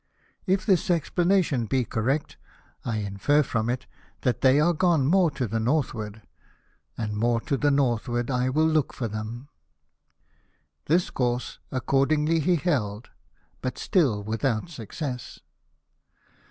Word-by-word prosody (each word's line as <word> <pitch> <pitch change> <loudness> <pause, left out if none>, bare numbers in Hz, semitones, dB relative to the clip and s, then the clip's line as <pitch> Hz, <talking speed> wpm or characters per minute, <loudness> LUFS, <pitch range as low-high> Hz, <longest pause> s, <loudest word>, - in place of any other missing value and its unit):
If 190 +2 +1
this 190 -4 +2
explanation 170 - +2
be 130 +2 +1
correct, 130 +8 -1 0.5
I 115 -2 -2
infer 105 +9 +1
from 115 -3 -1
it 125 +1 -2 0.4
that 125 - 0
they 135 +2 +5
are 170 +3 +3
gone 165 -4 +2
more 175 +3 +4
to 130 -4 -3
the 115 +2 -1
northward: 110 -5 -1 0.7
and 105 -2 -3
more 115 +2 +1
to 140 - -1
the 145 +2 +2
north 130 -5 +1
ward 120 +2 -1
I 125 0 +1
will 155 +4 +2
look 155 -3 +1
for 120 - -3
them." 110 +5 -6 1.4
This 175 +4 +2
course 125 -1 -2
accordingly 150 +5 +2
he 175 +4 +2
held, 120 - -1 0.5
but 130 - -3
still 130 - +1
without 115 +6 -1
success. 125 - -6
130 Hz, 135 wpm, -26 LUFS, 115-155 Hz, 1.4 s, they